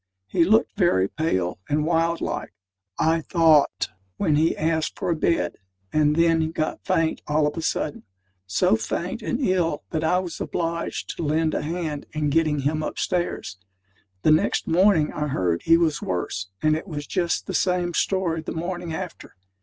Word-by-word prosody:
He 170 - +2
looked 215 +6 +3
very 175 - +3
pale 95 - -1
and 150 +1 +1
wild 165 0 +1
like, - - -4 0.4
I 165 +1 +2
thought, 160 -3 +3 0.3
when 150 - +2
he 160 +2 +2
asked 160 0 0
for - - -1
a - - +2
bed; 155 - 0 0.4
and 150 -1 +3
then 165 -1 +3
got 155 -1 -3
faint 165 -1 0
all 150 0 +2
of 150 - -1
a 165 - -3
sudden 155 -2 -2 0.5
so 95 +3 +3
faint 170 - -3
and 240 +3 -2
ill, 180 - +1
that 160 -1 -1
I 170 +3 +3
was 180 -2 -4
obliged 170 0 -3
to - - -3
lend 155 +1 +1
a - - 0
hand 155 -2 -4
in 150 -1 0
getting 155 -2 +2
him 155 +3 0
upstairs. 175 - -2 0.6
The 155 - +5
next 155 - +2
morning 170 -2 +3
I 150 0 -2
heard 90 - 0
he 165 0 +6
was 160 -3 +1
worse: 90 +1 -3 0.2
and 155 0 +4
it 160 - -5
was 145 -4 -5
just 175 -1 -1
the - - -5
same 180 -1 +1
story 175 -3 0
the 155 - -5
morning 175 0 -4
after. 180 -2 -7
160 Hz, 175 wpm, -24 LUFS, 150-170 Hz, 0.6 s, he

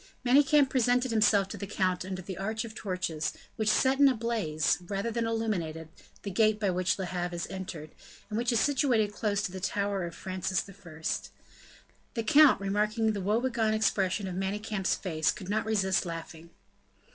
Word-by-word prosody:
Manicamp 280 +2 +5
presented 250 -1 +2
himself 210 -3 +3
to - - -6
the 200 - -6
count 185 -2 0
under 185 0 -5
an 190 -3 -5
arch 220 +3 -2
of 220 - -9
torches, 180 -7 -3 0.2
which 215 -1 0
set 265 +5 +3
in 285 - +8
a 265 - +3
blaze, 215 -12 0
rather 200 +4 -2
than 230 0 -1
illuminated, 175 -9 -2 0.3
the 200 - -4
gate 215 +2 +3
by 200 -3 +1
which 180 +1 0
Le 190 - -3
Havre 175 0 -3
is 170 - -3
entered, 170 -5 -7 0.4
and 210 - -5
which 240 +3 +1
is 235 - +2
situated 250 -7 +2
close 210 -1 -1
to 195 - -3
the 190 - -6
tower 200 0 -1
of 170 - -7
Francis 185 0 -2
I. 175 -5 -13 1.1
The 230 - -1
count, 290 +3 +6
remarking 210 +3 0
the 200 - -3
woe 210 +4 +1
begone 230 -4 +1
expression 195 -2 +1
of 185 - -4
Manicamp's 195 +1 -1
face, 160 -4 -1
could 190 -2 -9
not 215 +1 0
resist 190 -3 +1
laughing. 165 -1 -7
205 Hz, 180 wpm, -29 LUFS, 185-225 Hz, 1.1 s, in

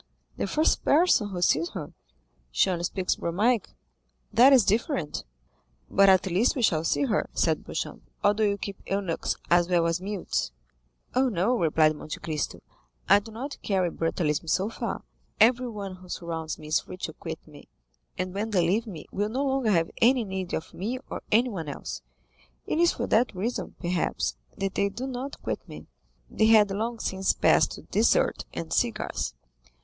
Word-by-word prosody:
"The - - -2
first 310 +11 +2
person 290 - +4
who 180 -2 -3
sees 165 +1 +3
her." 155 -6 -6 0.6
"She - - +2
only 175 -1 -1
speaks 185 0 -1
Romaic." 210 +6 +1 0.6
"That 255 +4 +7
is 260 -5 +7
different." 215 - 0 0.7
"But 195 0 +6
at 190 -1 +5
least 190 +7 +2
we 255 - -1
shall 160 -6 +3
see 145 -3 +1
her," - - 0
said - - +1
Beauchamp, - - -5 0.2
"or 205 - +5
do 215 +1 0
you 200 -1 +2
keep 200 -1 -6
eunuchs 195 -4 -1 0.2
as 175 0 +4
well 175 -2 +3
as 170 +1 0
mutes?" 195 - -2 0.6
"Oh, 260 +1 +3
no," 210 +4 +1
replied 155 -5 +3
Monte 150 - -7
Cristo; 155 -3 -3 0.5
"I - - +7
do 225 +2 -12
not 265 +6 -6
carry 185 -4 0
brutalism 165 -2 -1
so 190 +7 +1
far. - - -4 0.4
Everyone 220 -5 +2
who 185 0 -15
surrounds 165 -2 -4
me 155 -1 -10
is 155 - +3
free 185 - -10
to 160 - -5
quit 160 0 -8
me, 150 -2 -14 0.5
and 185 0 -3
when 210 +3 -2
they 185 -5 +2
leave 220 +6 +1
me 170 -8 -8
will 205 +2 -1
no 265 +5 -1
longer 265 -4 +1
have 165 -5 +2
any 245 +1 +5
need 190 -3 -3
of 160 - -6
me 225 +7 -3
or - - -4
anyone 210 - +1
else; 65 - -6 0.6
it - - -1
is 345 0 +5
for - - -3
that 230 -2 +2
reason, 225 +7 -3
perhaps, 175 -1 -1 0.2
that 195 -1 -2
they 200 0 +1
do 240 +6 -5
not 265 +1 -5
quit - - -2
me." - - -9 0.4
They 220 - +2
had 215 -3 +6
long 225 +4 -2
since 190 -3 0
passed - - +3
to - - -10
dessert - - +2
and 80 -1 -5
cigars. - - -1
195 Hz, 180 wpm, -27 LUFS, 170-225 Hz, 0.7 s, That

